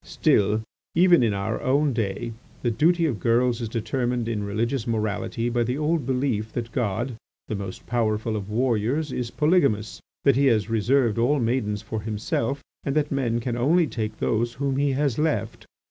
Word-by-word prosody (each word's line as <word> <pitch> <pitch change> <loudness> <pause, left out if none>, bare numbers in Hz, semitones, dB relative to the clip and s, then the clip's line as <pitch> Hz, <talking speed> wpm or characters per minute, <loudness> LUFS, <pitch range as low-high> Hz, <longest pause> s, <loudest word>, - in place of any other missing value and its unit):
"Still, 105 +2 +2 0.3
even 175 -1 +6
in 115 -3 +3
our 100 +2 -2
own 140 +2 +2
day, 115 +1 -2 0.3
the 120 - +2
duty 165 +8 +3
of 130 -9 -1
girls 120 +1 +2
is 115 - -3
determined 120 +1 -1
in 110 -3 -2
religious 115 +5 -1
morality 115 +1 -1
by 120 0 0
the 125 +3 0
old 155 -2 0
belief 125 -5 0
that 115 -1 -4
God, 115 +2 -2 0.3
the - - -3
most 100 -2 -6
powerful 110 -2 0
of 105 -1 -4
warriors, 125 +5 0
is 125 -2 -3
polygamous, 140 - +1 0.2
that 140 -3 +5
he 140 +1 +3
has 110 -3 +2
reserved 115 0 +2
all 140 +5 +3
maidens 115 -4 -1
for 110 -1 -4
himself, 115 +5 -2 0.2
and 140 - -2
that 150 -1 +1
men 120 -4 0
can 120 0 -2
only 160 +8 +3
take 110 -6 -4
those 115 +2 0
whom 135 +1 -1
he 140 -1 +2
has 140 -2 0
left. 120 -8 -1
120 Hz, 175 wpm, -25 LUFS, 110-135 Hz, 0.3 s, even